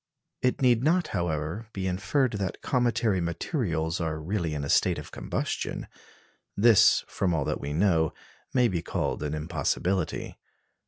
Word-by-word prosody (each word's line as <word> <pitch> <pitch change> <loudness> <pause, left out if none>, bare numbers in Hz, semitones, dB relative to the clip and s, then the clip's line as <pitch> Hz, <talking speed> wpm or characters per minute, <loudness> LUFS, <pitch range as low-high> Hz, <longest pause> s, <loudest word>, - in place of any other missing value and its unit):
It 125 +1 +1
need 120 -2 +4
not, 175 +3 +2
however, 85 +5 -2
be 95 -1 -3
inferred 100 +8 +1
that 95 -3 -4
cometary 120 -6 +1
materials 85 - -1
are 80 -2 -2
really 85 -1 -2
in 70 - -3
a - - -3
state - - +3
of - - -8
combustion. - - -3 0.7
This, 105 0 +6
from 90 -4 0
all 75 -3 0
that - - -2
we 70 - -4
know, 80 -1 +2 0.4
may 125 -2 +4
be 90 -6 -1
called - - -2
an 75 0 -2
impossibility. 85 +3 -2
90 Hz, 150 wpm, -27 LUFS, 80-115 Hz, 0.7 s, This